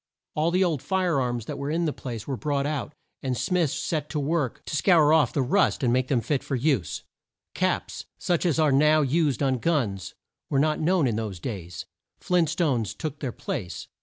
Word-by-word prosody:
All 155 +2 +1
the 185 +2 +3
old 160 -7 0
fire 180 -7 +1
arms 120 -3 -2
that - - -5
were 140 - -3
in 165 +2 0
the 155 - 0
place 115 -4 -6
were 135 - -1
brought 140 +1 -1
out, 150 0 -3 0.3
and 130 -2 -2
smiths 160 +5 +1
set 150 -2 -2
to 150 - -2
work 145 -2 -1
to - - -4
scour 155 -1 +5
off 160 -2 +4
the 140 - 0
rust 170 +2 +2
and 120 -2 +3
make 130 0 +1
them 130 -4 +1
fit 140 +2 -1
to 135 - -3
use. 125 - 0 0.5
Caps, - - -1
such 175 -2 0
as 170 -5 +1
are 155 -2 +4
now 150 +3 +5
used 145 -1 +1
on 130 -2 +1
guns, 115 - -1 0.3
were 140 - +1
not 155 +2 +2
known 175 -1 +2
in 115 -4 0
those 105 -5 -4
days. 90 -5 -6 0.3
Flint 175 -3 +2
stones 145 - 0
took 155 -2 -5
their 130 -4 -3
place. 90 -6 -5
145 Hz, 205 wpm, -26 LUFS, 125-160 Hz, 0.5 s, scour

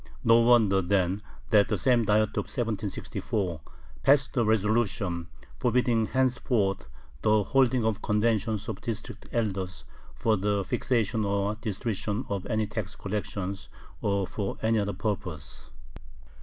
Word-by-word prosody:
No 115 +1 +6
wonder 115 -5 +5
then 95 +1 +1 0.3
that 105 -2 +5
the - - 0
same 120 -3 +3
Diet 105 +1 +3
of - - -2
1764 105 - -2 0.4
passed 140 0 +3
a 120 - +3
resolution 105 -5 +1 0.3
forbidding 120 -3 +2
henceforth 125 -6 0 0.3
the 105 -1 +3
holding 130 0 +2
of 110 -1 0
conventions 105 -1 0
of 110 -4 -5
District 115 -2 -6
elders 95 - -2 0.3
for 110 -1 +1
the 100 +1 0
fixation 115 +1 0
or 100 0 0
distribution 110 +1 -3
of 100 -2 -3
any 110 -2 0
tax 105 -2 -5
collections 100 -1 -4 0.3
or 100 -1 +1
for 100 +2 -4
any 110 0 +3
other 100 0 -1
purpose. 90 -7 -5
105 Hz, 130 wpm, -28 LUFS, 100-115 Hz, 0.4 s, No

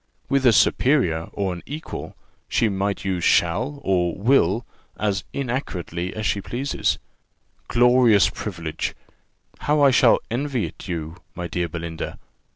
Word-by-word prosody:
With 135 -1 +3
a - - +8
superior 105 - +3
or 95 -2 -2
an 90 - -8
equal, 150 +3 -6 0.3
she 115 - +2
might 100 0 -2
use 90 -3 -1
shall 115 - +2
and 90 0 0
will 120 -4 +3 0.3
as 100 -4 -1
inaccurately 95 - -3
as 110 0 -3
she 100 - 0
pleases. 130 +7 -1 0.7
Glorious 120 -3 +5
privilege! 85 -6 -4 0.6
How 150 0 +1
I 140 - +7
shall 125 -2 +5
envy 130 -1 -1
it - - -9
you, 80 -2 -4 0.2
my 90 - -4
dear 85 0 -2
Belinda! 85 0 -5
100 Hz, 135 wpm, -23 LUFS, 85-125 Hz, 0.7 s, a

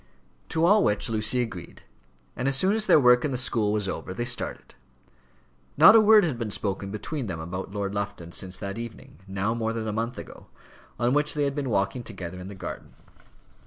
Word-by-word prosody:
To 165 +1 +1
all 205 +3 +5
which 105 +2 0
Lucy 110 +3 +1
agreed, 95 -7 -9 0.5
and 125 - -2
as 135 -1 +3
soon 190 +7 +4
as 220 0 0
their - - +7
work 125 -2 +5
in 150 - 0
the 130 - -2
school 115 -4 +1
was 105 -2 -1
over 95 0 -5
they 120 - -2
started. 120 - -4 1.0
Not 215 - +9
a - - +9
word 215 0 +6
had 145 -9 -2
been 115 -3 -3
spoken 100 -1 -2
between 115 +6 -5
them 85 -4 -4
about 90 +4 -5
Lord 100 -1 -3
Lufton 100 -4 -4
since 95 +1 -4
that 100 +3 -5
evening, 120 +3 -9
now 95 +3 -1
more 115 -1 -2
than 115 -1 -4
a 105 - -2
month 115 +3 -3
ago, - - -10 0.5
on 120 +1 +1
which 150 +1 +2
they 145 - 0
had 140 -1 0
been 140 -2 -3
walking 100 +2 0
together 95 -6 -8
in 90 - -8
the 100 - -9
garden. 95 - -8
115 Hz, 210 wpm, -26 LUFS, 100-135 Hz, 1.0 s, Not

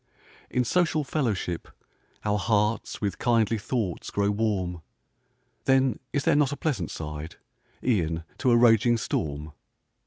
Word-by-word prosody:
In 125 - +1
social 160 +2 +2
fellowship, 110 - -2 0.6
our 105 0 +1
hearts 105 +1 0
With 100 -3 -2
kindly 115 -2 +2
thoughts 105 -5 -2
grow 100 0 +1
warm; 100 -5 -1 0.8
Then 135 -3 +3
is 140 - 0
there - - +3
not 145 -2 +3
a 145 - -4
pleasant 125 - -1
side, 75 0 -6 0.5
E'en 85 -9 +1 0.2
to 130 - +2
a 120 - +6
raging 120 0 +5
storm? 75 -7 -3
110 Hz, 130 wpm, -27 LUFS, 90-125 Hz, 0.8 s, a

